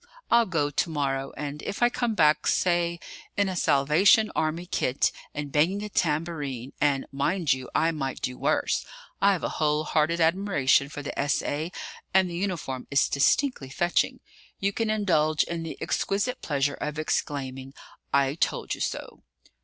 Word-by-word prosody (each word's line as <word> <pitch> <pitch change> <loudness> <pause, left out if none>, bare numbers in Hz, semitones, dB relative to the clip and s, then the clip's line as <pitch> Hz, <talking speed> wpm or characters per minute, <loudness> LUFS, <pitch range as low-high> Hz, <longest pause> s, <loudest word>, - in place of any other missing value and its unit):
I'll 235 -1 +5
go 150 -5 0
to 155 - 0
morrow; 135 -3 -2
and 145 0 -5
if 200 - -3
I 240 - +6
come 240 -2 -1
back, 155 -4 +3
say, 175 -1 +1 0.4
in 200 -1 +3
a 190 - -3
Salvation 170 +9 +4
Army 160 +2 -1
kit, 135 -7 0 0.2
and 145 -1 -4
banging 180 +8 +2
a 210 - -5
tambourine 150 - -2
and, 140 -2 +2
mind 150 +4 +1
you! 130 -1 -6
I 165 - +3
might 135 -5 -4
do 125 - -3
worse: - - 0 0.4
I've 195 -3 +3
a - - 0
whole 150 0 +2
hearted 155 +2 +1
admiration 160 -6 +3
for 145 0 -7
the - - -4
S.A. 145 +3 -1 0.4
and 190 -1 +5
the - - -5
uniform 170 -9 -3
is 140 0 +3
distinctly 140 - +1
fetching 175 +6 0 0.4
you 200 +1 0
can 225 +1 -1
indulge 160 -8 +2
in 170 -1 -4
the 165 - -6
exquisite 225 +6 -1
pleasure 145 -1 0
of 150 0 -3
exclaiming, 135 -3 -3 0.4
'I 140 0 +2
told - - 0
you - - -6
so!' - - -4
155 Hz, 160 wpm, -26 LUFS, 140-185 Hz, 0.4 s, I